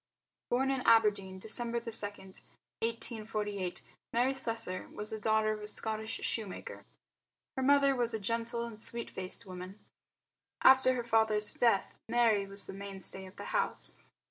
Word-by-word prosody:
Born 265 +2 +2
in 265 -1 0
Aberdeen, 210 -5 +4
December 235 +4 0
2, 230 0 -6
1848, 210 0 -3 0.3
Mary 245 +3 +2
Slessor 225 -8 -3
was 210 +1 -5
the 220 - -4
daughter 220 0 +2
of 215 - -6
a 210 - -6
Scottish 220 +1 -2
shoemaker. 215 -5 -4 0.7
Her 265 - -1
mother 280 0 +5
was 240 -2 0
a - - -2
gentle 230 +3 -1
and 220 -2 -9
sweet 235 0 0
faced 185 +2 -5
woman. 185 +1 -8 0.9
After 260 -1 +7
her 245 - -2
father's 220 -2 +2
death 230 -5 +2 0.2
Mary 225 -4 +3
was 200 +1 0
the - - -7
mainstay 195 -1 -6
of 185 - -14
the - - -8
home. 480 -1 +1
220 Hz, 145 wpm, -32 LUFS, 200-235 Hz, 0.9 s, After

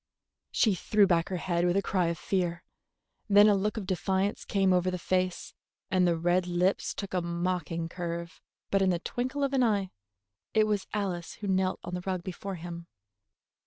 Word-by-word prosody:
She 220 -4 +3
threw 205 +3 +3
back 170 -3 +2
her 190 - -2
head 170 0 0
with 175 +2 +2
a - - +3
cry 185 -3 +1
of 170 0 -1
fear. 175 -2 -1 0.7
Then 205 +1 +7
a 210 - +6
look 205 +2 0
of 210 - -3
defiance 190 +2 -1
came 195 -2 +2
over 180 0 +2
the 180 - -2
face, 185 +1 -1 0.4
and 185 -1 +4
the 170 -1 +2
red 175 +2 +1
lips 180 +2 0
took 200 -2 -6
a 180 - +1
mocking 170 -1 -2
curve; 170 -1 -5 0.3
but 195 - +3
in 190 - +3
the 175 - +2
twinkle 255 +9 -3
of 275 0 0
an 265 - +3
eye 205 -6 +1 0.6
it 215 0 +5
was 210 -2 -1
Alice 185 -5 -3
who 205 - -7
knelt 190 -1 +1
on 175 - -6
the 180 - -2
rug 185 -1 -3
before 190 +2 -5
him. 170 0 -8
185 Hz, 195 wpm, -29 LUFS, 175-200 Hz, 0.7 s, Then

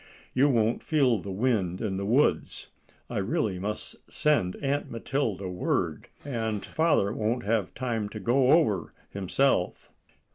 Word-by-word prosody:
You 135 +3 +4
won't 115 -3 +2
feel 135 -8 +2
the 100 - -7
wind 95 -4 0
in 100 -4 -2
the 100 0 -3
woods. 130 +7 +1 0.4
I - - -3
really 105 - -1
must 105 +3 -5
send 140 -12 +2
Aunt 140 +1 -2
Matilda 115 -5 -2
word, 90 -1 -1 0.2
and 110 -6 -2
father 155 -11 +2
won't 115 +3 -1
have 105 -3 0
time 115 -5 -2
to 110 - -7
go 125 +6 +2
over 110 - +3 0.2
himself." 100 +1 0
110 Hz, 140 wpm, -27 LUFS, 100-135 Hz, 0.4 s, You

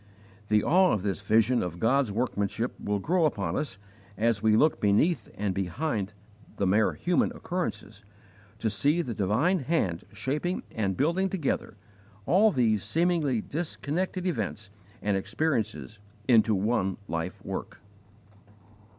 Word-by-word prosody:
The 105 0 +3
awe 185 +3 +4
of 100 - -1
this 100 -1 -2
vision 110 +5 +3
of 90 -1 -4
God's 120 +4 +2
workmanship 110 0 -1
will 105 0 0
grow 165 - +1
upon 105 -10 -1
us 145 -10 -3 0.4
as 115 -1 +1
we 110 -1 +4
look 155 +6 +3
beneath 110 - +2
and 100 -2 -1
behind 100 - -2 0.4
the 100 - +1
mere 105 +3 +3
human 175 -1 +1
occurrences 180 0 -4 0.5
to 110 - -1
see 145 +11 +2
the 120 - -4
divine 110 - +1
Hand 125 - -1
shaping 150 +7 -2
and 100 -5 -1
building 170 +7 +1
together 165 - -2 0.5
all 210 +5 +5
these 110 - +2
seemingly 165 -8 +1
disconnected 175 - -3
events 105 - -3 0.3
and 105 -1 +1
experiences 110 -1 -2 0.3
into 110 -3 +5
one 95 -2 0
life 85 +2 -3
work. - - -5
115 Hz, 135 wpm, -28 LUFS, 100-160 Hz, 0.5 s, all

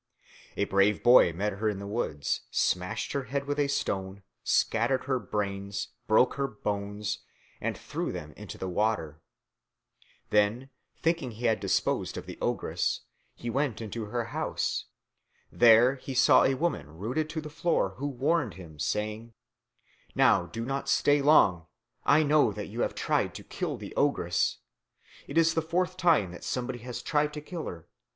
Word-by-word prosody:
A - - +2
brave 100 +1 +2
boy 120 -8 +7
met 100 +5 -2
her 110 +3 -1
in 105 - -3
the 100 - -6
woods, 100 -9 -2
smashed 90 0 0
her 140 -2 -2
head 140 +2 -2
with 145 +1 -2
a 145 - +3
stone, 95 -7 -2 0.2
scattered 120 +4 +2
her 130 -2 0
brains, 100 -2 -3 0.2
broke 110 +4 +4
her 140 0 0
bones, 105 -2 -3 0.4
and - - -2
threw - - -4
them - - -7
into - - -9
the 95 - -4
water. 90 -6 -1 1.1
Then, 110 +6 +2 0.3
thinking 165 -5 +1
he 115 +1 -6
had 110 -2 +3
disposed - - 0
of - - -6
the - - -9
ogress, - - -1 0.3
he 120 - -5
went 135 -2 -1
into 110 0 -5
her 115 +2 -2
house. - - -1 0.7
There 120 +2 +6
he 130 +1 -7
saw 125 - +6
a 135 - +2
woman 80 - -2
rooted 125 - -2
to 160 - -3
the 155 - -7
floor, 150 - +1
who 140 - -2
warned 145 +4 0
him, 80 -5 -12
saying, 110 +7 -2 0.8
"Now - - +4
do 115 0 -5
not 135 +1 -3
stay 145 +1 +4
long. 95 - +4 0.4
I 150 +2 +5
know 145 -5 +4
that 105 0 -6
you 115 +4 -4
have - - -1
tried - - 0
to - - -8
kill - - -4
the - - -9
ogress. - - +1 0.7
It 140 - -4
is 165 0 +5
the 160 - +1
fourth 180 +3 -1
time 165 - +3
that 90 - -10
somebody 125 0 -3
has 120 +1 -7
tried 150 -1 +1
to 150 - -5
kill 165 +2 -6
her. 85 -1 -8
115 Hz, 170 wpm, -28 LUFS, 100-140 Hz, 1.1 s, boy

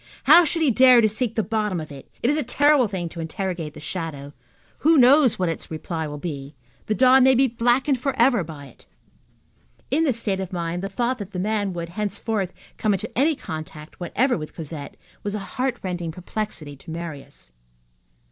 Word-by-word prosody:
How 350 - +8
should 330 +1 0
he 285 - +4
dare 255 +1 +7
to 220 - +5
seek 225 +2 -2
the 220 - +1
bottom 210 -5 -1
of 155 -1 -8
it? 140 -1 -11
It 245 - +3
is 295 - 0
a - - +2
terrible 285 0 +3
thing 185 -4 -4
to 170 - -10
interrogate 165 -1 -4
the - - -9
shadow. 150 -4 -5 0.5
Who 320 +1 +4
knows 260 0 +6
what 185 - 0
its 165 - -4
reply 160 0 -4
will 150 0 -6
be? 145 -2 -6 0.3
The 215 - 0
dawn 260 +1 +6
may 265 0 +6
be 265 +2 +4
blackened 245 +3 +1
forever 250 -4 +2
by 150 -3 -9
it. 130 - -17 1.0
In 305 +5 +2
this 265 -7 +1
state 200 -4 -1
of 190 -1 -5
mind 170 -1 -3
the 195 - -4
thought 240 +5 -1
that 200 -1 -8
that 180 - -3
man 205 0 0
would, 170 -1 -5
henceforth, 205 0 -2 0.3
come 215 -3 +1
into 215 +3 -6
any 295 +5 +3
contact 155 - -8
whatever 245 +9 +1
with 155 - -8
Cosette 155 -3 -7 0.2
was 205 0 -3
a - - -2
heartrending 195 -7 -3
perplexity 180 -4 -5
to 140 - -15
Marius. 160 - -8
200 Hz, 195 wpm, -23 LUFS, 165-250 Hz, 1.0 s, How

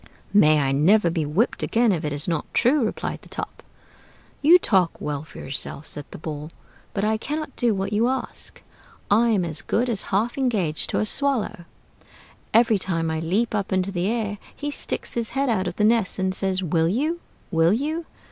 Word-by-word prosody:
"May 155 -7 +6
I 135 -2 +1
never 170 +6 +4
be 160 -3 -1
whipped 185 +11 0
again 230 -1 +2
if 175 -3 -1
it 150 - -2
is 145 +3 -3
not 165 -3 -2
true!" 270 +2 +3
replied 215 - -3
the - - -17
Top. - - -6 0.8
"You 330 +5 +8
talk 190 - +1
well 145 -1 -3
for 155 - -14
yourself," 140 +2 -2
said 145 -1 -6
the - - -9
Ball, 150 -1 -6 0.5
"but 200 - 0
I 220 +1 +2
cannot 300 +4 -4
do 235 -3 +1
what 195 +2 -2
you 225 +3 +3
ask. 260 +1 -5 0.5
I 230 +3 +5
am 200 -6 +2
as 160 -2 -2
good 245 +2 0
as 215 -4 0
half 225 +7 0
engaged 200 - 0
to - - 0
a - - +1
swallow: 220 -7 -1 0.9
every 225 -2 +4
time 165 -3 -1
I 160 - -1
leap 195 +9 0
up 205 -2 -2
into 190 +1 +1
the 180 0 -1
air 210 -2 -2 0.2
he 290 0 -4
sticks - - -3
his 235 -2 -2
head 275 -1 +2
out 195 -5 +1
of - - -4
the 210 - 0
nest 220 -3 +2
and 190 -1 0
says, 190 0 0
'Will 165 -1 +1
you? 300 - 0 0.3
will 165 0 +4
you?' 310 +7 -2
200 Hz, 200 wpm, -24 LUFS, 165-235 Hz, 0.9 s, You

